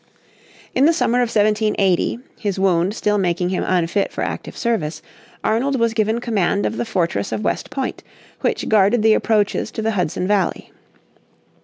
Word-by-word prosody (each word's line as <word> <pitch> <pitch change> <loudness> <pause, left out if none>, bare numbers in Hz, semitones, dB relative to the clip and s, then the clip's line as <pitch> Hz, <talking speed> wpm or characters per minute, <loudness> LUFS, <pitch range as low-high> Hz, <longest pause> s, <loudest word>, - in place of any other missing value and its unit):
In 265 - +3
the 330 - +5
summer 250 -7 +1
of 245 -2 +1
1780, 210 -3 +1 0.2
his 200 -3 -2
wound 190 +1 +2
still 210 -2 +1
making 180 -1 0
him 185 - -1
unfit 185 +2 0
for - - -3
active - - -5
service, 200 -10 -2 0.4
Arnold 260 +5 +1
was 230 -1 +2
given 220 +1 +1
command 205 -4 0
of 225 - -2
the - - -1
fortress 190 -3 -1
of 215 - -3
West - - -2
Point, 265 -2 -4 0.4
which - - -1
guarded 215 +2 +3
the 220 0 +6
approaches 215 -1 +1
to 220 -1 -5
the 225 - +1
Hudson 180 -2 -1
Valley. 200 -3 0
210 Hz, 165 wpm, -20 LUFS, 190-230 Hz, 0.4 s, the